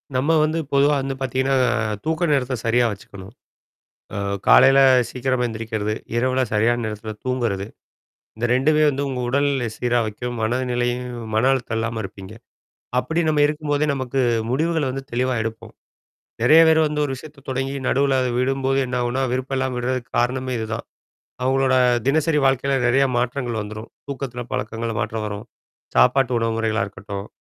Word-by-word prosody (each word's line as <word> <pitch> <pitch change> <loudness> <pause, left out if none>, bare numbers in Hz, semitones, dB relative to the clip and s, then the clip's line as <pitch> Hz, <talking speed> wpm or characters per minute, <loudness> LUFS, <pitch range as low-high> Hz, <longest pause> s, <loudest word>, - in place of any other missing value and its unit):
நம்ம 135 +5 +2
வந்து 155 +1 0
பொதுவா 140 +1 +4
வந்து 135 0 -3
பாத்தீங்கன்னா, 130 +1 0 0.5
தூக்க 160 +2 -1
நேரத்தை 130 -2 +1
சரியா 120 +1 +3
வச்சுக்கணும். 100 -1 -10 0.8
அ - - -3 0.3
காலையில 135 0 +7 0.3
சீக்கிரமா 130 -1 -1
எந்திரிக்கிறது, 110 -2 -3 0.2
இரவில 130 +2 +1
சரியான 120 +3 +2
நேரத்தில 110 0 -5
தூங்குறது. 120 -7 -1 0.7
இந்த 115 +2 0
2மே 150 +4 +3
வந்து 140 0 -3
உங்க 130 -2 -3
உடல் 140 +3 +2
நிலைய 125 -4 -1
சீரா 120 0 +1
வைக்கும், 120 +3 -5
மனநிலையும் 125 +1 -1 0.2
மன 110 +4 +3
அழுத்தம் 120 -4 -2
இல்லாம 115 0 -2
இருப்பீங்க. 95 +1 -9 0.6
அப்படி 160 +6 0
நம்ம 150 -1 +3
இருக்கும்போதே, 150 0 -1
நமக்கு 130 0 -2 0.3
முடிவுகளை 160 +3 0
வந்து 135 +1 -5
தெளிவா 125 +1 0
எடுப்போம். 110 0 -6 0.7
நெறையா 155 +7 +7
பேர் 160 0 +5
வந்து 150 0 -2
ஒரு 140 - -2
விஷயத்தை 150 +2 -12
தொடங்கி, 135 +1 -2
நடுவுல 135 0 +2
அதை 125 - 0
விடும்போது 135 +1 +1
என்னாகும்ன்னா? 125 +1 -1
விருப்பம் 130 +1 -2
இல்லாம 130 -1 -1
விடுறதுக்கு 125 0 -3
காரணமே 130 +1 0
இதுதான். 110 +1 -4 0.6
அவுங்களோட 130 0 +2 0.3
தினசரி 150 +2 +2
வாழ்க்கையில 135 +1 +1
நெறையா 135 +3 +4
மாற்றங்கள் 120 -2 -2
வந்துரும். 110 +2 -8 0.2
தூக்கத்தில 130 -3 -5
பழக்கங்கள்ல 115 -2 -3
மாற்றம் 110 -1 -3
வரும். 105 +2 -6 0.5
சாப்பாட்டு 125 - +4
உணவுமுறைகளா 115 -1 0
இருக்கட்டும், 100 0 -7
125 Hz, 145 wpm, -22 LUFS, 115-135 Hz, 0.8 s, காலையில